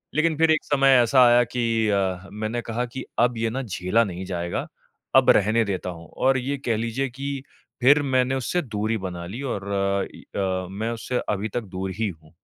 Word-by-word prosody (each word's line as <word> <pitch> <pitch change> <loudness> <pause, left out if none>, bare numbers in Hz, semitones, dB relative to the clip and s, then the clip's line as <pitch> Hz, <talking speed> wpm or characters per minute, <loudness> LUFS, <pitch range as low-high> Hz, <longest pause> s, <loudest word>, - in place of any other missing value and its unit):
लेकिन 155 0 +2
फिर 160 0 +4
एक 155 - +2
समय 135 -2 +4
ऐसा 125 +2 +5
आया 120 0 +6
कि 115 -2 +1
अ, 95 -1 0
मैंने 110 +3 -3
कहा 115 +2 -2
कि 125 +2 -7 0.2
अब 120 0 +3
ये 115 0 0
ना 135 +2 -2
झेला 100 +1 +1
नहीं 95 -2 -5
जाएगा, 85 -2 -3 0.5
अब - - +6
रहने 110 +3 +3
देता 95 -2 -3
हूँ। 85 -2 -9
और 130 0 +3
ये 140 +3 -2
कह 115 -3 +1
लीजिए 115 +4 -2
कि 140 +2 -5 0.4
फिर 145 +4 +6
मैंने 130 -1 +1
उससे 135 +7 -1
दूरी 110 -3 -2
बना 90 -3 -5
ली 115 +8 -6
और 100 -8 -4
अ, 100 0 +1
इ - - -13 0.2
अ, 95 -1 -1
मैं 110 +4 -3
उससे 120 +2 -2
अभी 105 +1 -1
तक 120 - +1
दूर 95 +1 -3
ही 110 -3 +1
हूँ। 80 -2 -13
115 Hz, 205 wpm, -24 LUFS, 95-130 Hz, 0.5 s, आया